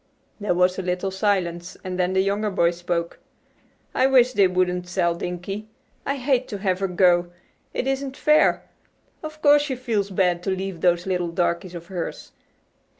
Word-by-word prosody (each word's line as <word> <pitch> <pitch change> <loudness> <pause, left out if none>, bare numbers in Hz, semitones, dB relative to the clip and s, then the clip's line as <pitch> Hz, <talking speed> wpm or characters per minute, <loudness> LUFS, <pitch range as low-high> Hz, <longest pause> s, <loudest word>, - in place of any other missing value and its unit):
There 205 -4 0
was 180 +1 +2
a - - 0
little 180 +1 -2
silence, 185 -3 -1
and 185 0 -4
then 180 +1 +1
the 190 0 +3
younger 205 +2 0
boy 170 -3 +2
spoke. 175 -1 -3 0.7
"I 260 - +3
wish 255 -1 +4
they 200 -4 +5
wouldn't 180 -1 0
sell 175 -1 +1
Dinkie. 180 +5 -5 0.4
I 275 - 0
hate 260 -1 0
to 205 - -5
have 190 -2 -1
her 195 - 0
go. 175 -1 +3 0.4
It - - -2
isn't 270 0 -2
fair. 305 0 +3 0.6
Of 310 -1 -9
course 290 0 +6
she 290 -3 -2
feels 225 -6 -1
bad 180 -2 +1
to 185 - -3
leave 190 -2 -3
those 175 -1 +2
little 180 -2 -1
darkies 175 +1 -1
of 170 0 -8
hers. 175 -1 -6
185 Hz, 175 wpm, -23 LUFS, 175-215 Hz, 0.7 s, course